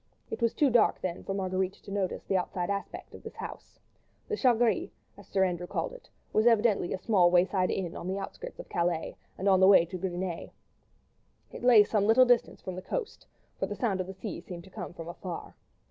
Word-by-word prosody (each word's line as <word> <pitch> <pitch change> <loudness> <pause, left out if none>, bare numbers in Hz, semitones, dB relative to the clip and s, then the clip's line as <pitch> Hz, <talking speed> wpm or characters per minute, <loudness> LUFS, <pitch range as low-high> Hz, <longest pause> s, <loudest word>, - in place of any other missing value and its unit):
It - - -4
was 230 -1 +1
too 285 -3 +3
dark 230 -2 +4
then 180 -1 -4
for 195 - -3
Marguerite 190 -1 -1
to 200 - -13
notice 195 -2 -2
the 195 - -1
outside 180 0 -1
aspect 200 0 -5
of - - -11
this - - -10
house. - - -9 0.5
The 430 - 0
"Chat 250 - +3
Gris," 235 -1 +1 0.3
as - - -15
Sir 190 -1 +2
Andrew 180 -1 -3
had - - -15
called - - -2
it, - - -14 0.2
was 215 +2 +4
evidently 220 -5 +3
a - - -1
small 185 -3 +4
wayside 185 +1 +3
inn 180 -3 -2
on 175 - -6
the 190 +1 -2
outskirts 345 - -7
of - - -9
Calais, 170 -1 -1 0.2
and 195 - -2
on 190 -1 +5
the 190 - +6
way 190 -4 +7
to 185 +2 -6
Gris 185 0 -3
Nez. 175 -1 -4 1.0
It - - -9
lay 240 -4 +8
some 205 -1 +1
little 245 +3 +7
distance 245 -1 +2
from 185 - -5
the 185 - -6
coast, 470 - -5 0.3
for - - 0
the 205 - -5
sound 200 -5 0
of 180 - -5
the 190 - -8
sea 195 -3 -6
seemed 175 -1 -9
to 190 - -16
come 190 -2 -6
from 165 -2 -9
afar. 175 0 -7
190 Hz, 230 wpm, -29 LUFS, 180-220 Hz, 1.0 s, lay